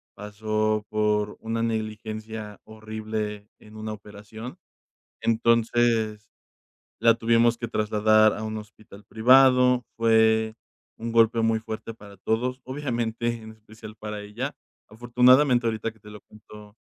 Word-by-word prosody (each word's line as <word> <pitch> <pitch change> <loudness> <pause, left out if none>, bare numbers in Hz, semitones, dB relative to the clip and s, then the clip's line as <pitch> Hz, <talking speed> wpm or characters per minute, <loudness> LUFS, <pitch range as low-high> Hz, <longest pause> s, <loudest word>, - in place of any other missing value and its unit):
pasó 110 +1 -2
por 105 -1 0
una 115 +1 -3
negligencia 110 -1 -5
horrible 110 -1 -6
en 110 0 -15
una 110 0 -5
operación. 105 +3 -10 0.6
Entonces, 115 -1 +1 0.7
la 115 -1 +5
tuvimos 115 0 +2
que 120 - -4
trasladar 110 0 +3
a 110 - -6
un 110 0 -4
hospital 105 -1 -14
privado, 125 +2 +4
fue 110 -1 +3 0.4
un 115 +1 -5
golpe 115 0 +4
muy 115 0 +2
fuerte 110 0 -7
para 100 -2 -14
todos, 125 +6 -2
obviamente, 120 -4 -3
en 110 - -10
especial 110 0 -13
para 105 -1 -6
ella. 120 +8 -5 0.3
Afortunadamente 125 +3 +3
ahorita 110 0 -2
que 110 - -26
te 105 - -16
lo 105 0 -11
cuento, 105 0 -16
110 Hz, 125 wpm, -25 LUFS, 105-115 Hz, 0.7 s, la